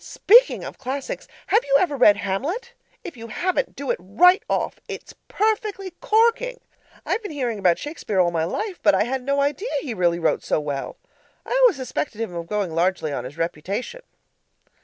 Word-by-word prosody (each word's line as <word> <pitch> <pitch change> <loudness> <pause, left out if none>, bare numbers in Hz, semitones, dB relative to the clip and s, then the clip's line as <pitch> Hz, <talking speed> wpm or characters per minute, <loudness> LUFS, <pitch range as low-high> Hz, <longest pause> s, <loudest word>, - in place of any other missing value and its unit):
Speaking 485 +5 +4
of - - -8
classics, 270 +1 -5 0.2
have 440 +4 +3
you 275 - +1
ever 320 -6 +1
read 210 -6 +6
Hamlet? 305 - -3 0.3
If 335 - -8
you 230 0 -8
haven't, 355 +11 -1
do 280 -1 -2
it - - -2
right 285 - +4
off. - - -1
It's - - -8
PERFECTLY 415 -2 -1
CORKING. 470 +3 +2 0.5
I've - - -1
been 415 - -6
hearing 245 -7 -2
about 180 -3 +3
Shakespeare 290 - -3
all 175 -1 +3
my 165 -2 0
life, 380 - -4
but 305 - +5
I - - +3
had 260 +3 -2
no 280 +2 0
idea 295 - -1
he 265 -6 -4
really 175 -3 +1
wrote 165 -2 0
so - - 0
well; 145 -2 -4 0.5
I - - -10
always - - +6
suspected 260 -3 -4
him 225 -5 -3
of 170 -1 -5
going 205 -4 -2
largely 170 -3 0
on 125 -3 -4
his 140 +5 -9
reputation. 185 - -4
255 Hz, 185 wpm, -23 LUFS, -, 0.5 s, read